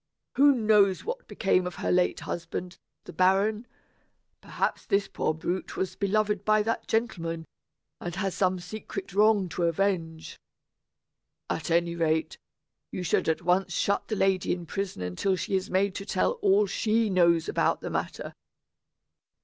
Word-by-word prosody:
Who 285 +2 +6
knows 210 -4 +3
what - - -5
became 185 -3 +1
of 180 - -6
her - - -2
late 180 0 +2
husband, 175 +1 -5 0.2
the - - -11
baron? 200 +5 +2 0.7
Perhaps - - -3
this 200 -1 +1
poor 155 - -1
brute 175 +4 -4
was 190 - -2
beloved 210 0 0
by 215 0 +3
that 230 +2 -2
gentleman, 165 -8 -2 0.5
and 175 -1 -5
has 190 0 -2
some 185 -1 +1
secret 195 +1 -7
wrong 205 -1 +4
to 175 +1 -1
avenge. 165 -2 -1 1.1
At 160 - -3
any 170 0 +2
rate, 160 -1 0 0.5
you 185 - -5
should 170 - +1
at 160 +1 -1
once 180 +1 +1
shut 200 +4 0
the 215 - -2
lady 190 -2 +1
in 175 -1 -6
prison 190 - -4
until 90 - 0
she 185 +2 -2
is 190 0 -1
made 195 +1 +1
to 200 - -6
tell 185 - +1
all 200 +1 +4
she 220 +3 +1
knows 170 -4 +3
about - - +1
the - - -5
matter. - - -4
190 Hz, 155 wpm, -27 LUFS, 175-205 Hz, 1.1 s, Who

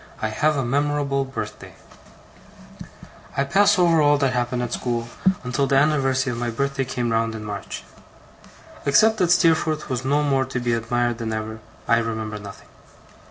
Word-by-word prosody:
I 110 - -1
HAVE 150 +7 +1
A 135 - -1
MEMORABLE 140 +1 0
BIRTHDAY 130 - -7 1.6
I 135 - +3
PASS 200 +8 +3
over 170 -3 +4
all 145 0 +4
that 135 -2 +1
happened 125 0 -1
at 120 0 -4
school, 120 -1 -2 0.3
until 125 +2 0
the 135 - +1
anniversary 135 -3 +2
of 115 - -5
my 120 0 -1
birthday 140 +3 -1
came 120 -2 -2
round 115 0 0
in 105 -1 -7
March. 100 -2 -6 1.0
Except 220 +10 +5
that 180 -4 +2
Steerforth 160 -4 +2
was 130 0 -2
more 140 0 +2
to 130 -1 -4
be 120 -1 0
admired 120 +1 -1
than 115 -1 -3
ever, 110 0 -4 0.3
I 115 - +4
remember 110 -2 -4
nothing. 100 -1 -11
130 Hz, 160 wpm, -23 LUFS, 115-145 Hz, 1.6 s, Except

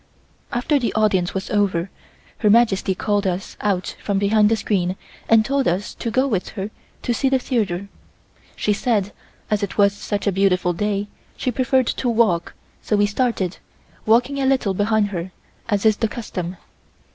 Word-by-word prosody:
After 265 +5 +1
the 240 - -1
Audience 200 -5 +2
was 190 - -3
over, 195 -3 +1 0.5
Her 210 - +3
Majesty 205 -4 +3
called 205 +1 0
us 185 +1 -3
out 195 -3 -1
from 200 -1 0
behind 210 +1 +4
the 225 - +3
screen 185 -4 0 0.3
and 225 -1 +5
told 275 +1 +1
us 180 +4 -1
to 230 - -4
go 260 +4 +2
with 210 -9 -1
her 195 +2 -3 0.3
to 240 - 0
see 270 +3 +1
the 265 - +3
theatre. 200 -7 -1 0.7
She 210 - +1
said, 205 -2 0 0.4
as 210 0 +2
it 200 - -4
was 200 -1 +5
such 205 0 -4
a 200 - +3
beautiful 180 -2 +2
day, 205 +2 -1 0.3
she 255 - -1
preferred 255 +1 +2
to 245 - -1
walk, 220 -8 +1 0.3
so 215 - 0
we 205 0 +4
started, 205 -4 -1 0.5
walking 245 +5 +3
a 265 - +2
little 260 -7 +2
behind 205 +1 +1
her, 185 -1 -5 0.4
as 205 0 0
is 215 -1 +5
the 225 - +1
custom. 185 -5 -5
205 Hz, 175 wpm, -21 LUFS, 195-230 Hz, 0.7 s, and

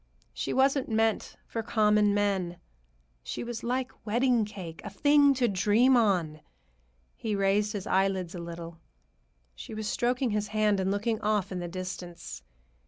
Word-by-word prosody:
She - - -3
wasn't 270 0 +2
meant 220 0 0
for 230 - -4
common 210 -2 +3
men. 190 -4 0 0.6
She - - -5
was 240 -1 -5
like 255 +2 -1
wedding 235 +1 +2
cake, 185 -6 -8
a 205 - -5
thing 285 +6 +4
to 250 -2 +2
dream 215 +6 +4
on. 180 -10 +1 0.7
He 215 -2 -2
raised 200 +2 +1
his 200 -3 -4
eyelids 190 -2 +1
a 180 - -6
little. 170 -1 -8 0.7
She 65 - -9
was 215 -1 -4
stroking 245 +2 0
his 210 0 -1
hand 210 -1 +1
and 190 0 0
looking 215 +3 -1
off 210 -2 0
into 180 -2 -3
the - - -9
distance. 180 -2 -7
210 Hz, 155 wpm, -28 LUFS, 185-230 Hz, 0.7 s, thing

